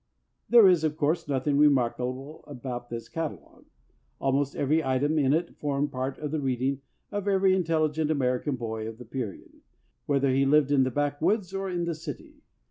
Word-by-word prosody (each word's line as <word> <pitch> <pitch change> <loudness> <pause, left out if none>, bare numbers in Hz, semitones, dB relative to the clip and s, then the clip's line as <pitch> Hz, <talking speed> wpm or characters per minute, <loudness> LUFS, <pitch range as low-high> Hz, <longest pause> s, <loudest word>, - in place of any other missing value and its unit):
There 235 -4 +8
is, 175 -4 +4
of 155 -1 -1
course, 160 +2 0
nothing 140 +1 0
remarkable 130 0 +1
about 125 -3 -6
this 115 -1 -6
catalogue. 165 -2 -6 0.5
Almost 135 +1 0
every 155 +3 +1
item 145 +4 +1
in 135 -2 +3
it 165 +3 0
formed 145 0 -1
part 130 +1 -3
of 150 -1 -5
the 155 - -1
read 130 -2 -1
ing 135 +1 0 0.3
of 205 -1 -3
every 195 -1 +3
intelligent 160 -3 0
American 130 -1 0
boy 110 -2 -4
of 110 0 -7
the 125 - -11
period, 115 -4 -7 0.5
whether 140 -2 +2
he 135 +1 +3
lived 145 0 +3
in 135 -2 +4
the - - 0
backwoods 155 - 0
or 195 0 -3
in 175 -1 -2
the 170 - -1
city. 235 - -9
145 Hz, 180 wpm, -27 LUFS, 130-160 Hz, 0.5 s, There